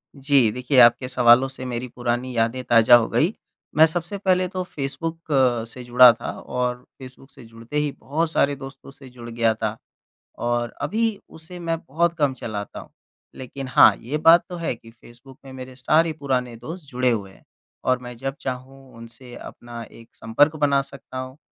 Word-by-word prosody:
जी। 135 -4 +3
देखिए, 125 +3 +1
आपके 120 +1 +6
सवालों 125 +1 +5
से 130 -1 -9
मेरी 125 0 -4
पुरानी 120 +1 -2
यादें 115 +3 0
ताज़ा 115 -1 +6
हो 120 -2 +3
गई। 175 +8 +1 0.4
मैं 160 +1 +7
सबसे 175 +4 -4
पहले 185 -2 +1
तो 185 0 -4
फेसबुक 165 +2 -6
अ, 125 -4 +2
से 125 +2 -9
जुड़ा 125 0 +7
था - - -6
और 125 0 -3 0.2
फेसबुक 130 +1 -13
से - - -15
जुड़ते 115 +5 -8
ही 150 -1 0
बहुत 160 +4 -2
सारे 140 -2 +1
दोस्तों 135 0 -11
से 135 -1 -15
जुड़ 120 -1 -11
गया 115 -1 +1
था 110 0 -4 0.6
और 120 0 -1
अभी 220 +7 -1
उसे 160 +3 -11
मैं 165 -1 -2
बहुत 170 +4 +1
कम 145 -3 +1
चलाता 105 -5 -6
हूँ। - - -13 0.5
लेक़िन 130 +1 -8
हाँ, 125 - +6
ये 140 +6 -4
बात 165 +2 +6
तो 180 - -6
है 170 -5 -2
कि 115 0 -17
फेसबुक 120 +3 -17
में 135 - -10
मेरे 130 0 -9
सारे 160 +5 +2
पुराने 125 -4 -2
दोस्त 165 +8 -8
जुड़े 125 0 0
हुए 100 -4 -3
हैं - - -21 0.4
और 130 -1 +1
मैं 125 0 -8
जब 135 +2 -4
चाहूँ 130 0 -7
उनसे 120 +2 -12
अपना 120 0 -10
एक 115 +1 -16
संपर्क 145 +7 +2
बना 140 -2 +2
सकता 135 -1 -11
हूँ। 130 +1 -8
130 Hz, 185 wpm, -22 LUFS, 120-145 Hz, 0.6 s, मैं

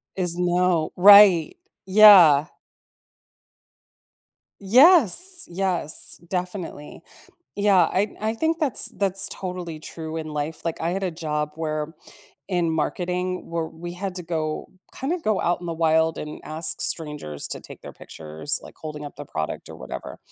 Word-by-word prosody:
Is 175 -2 -2
no 180 -2 +1
Right. 200 - +7 0.3
Yeah. 185 -8 +7 2.1
Yes, 320 - +4
yes, 175 -3 -2
definitely. 180 -5 -6 0.5
Yeah, 200 -4 +3
I 205 +3 -1
I 220 +1 -1
think 320 +6 -1
that's 290 -7 +2
that's 195 -1 +1
totally 180 -4 -6
true 160 0 -8
in 155 -1 -5
life. 150 +2 -5
Like, 165 - -4
I 165 +1 -1
had 195 +2 -3
a 185 - -1
job, 150 -2 -4
where 155 0 -4 0.5
in 175 -3 0
marketing, 180 +3 -3
where 165 -1 -2
we 175 +2 -9
had 185 +1 -5
to 180 - -5
go 155 -2 -4 0.3
kinda 325 +7 -3
go 215 -2 0
out 175 0 -1
in 175 - -8
the 165 - -3
wild 160 0 +1
and 150 0 -7
ask 155 +2 -1
strangers 150 - -3
to - - -5
take - - -13
their - - -11
pictures, 80 - -4
like, - - -14
holding 150 -1 -8
up 145 - -10
the 145 - -8
product 80 - -5
or - - -10
whatever. 65 - -8
175 Hz, 150 wpm, -23 LUFS, 155-195 Hz, 2.1 s, Right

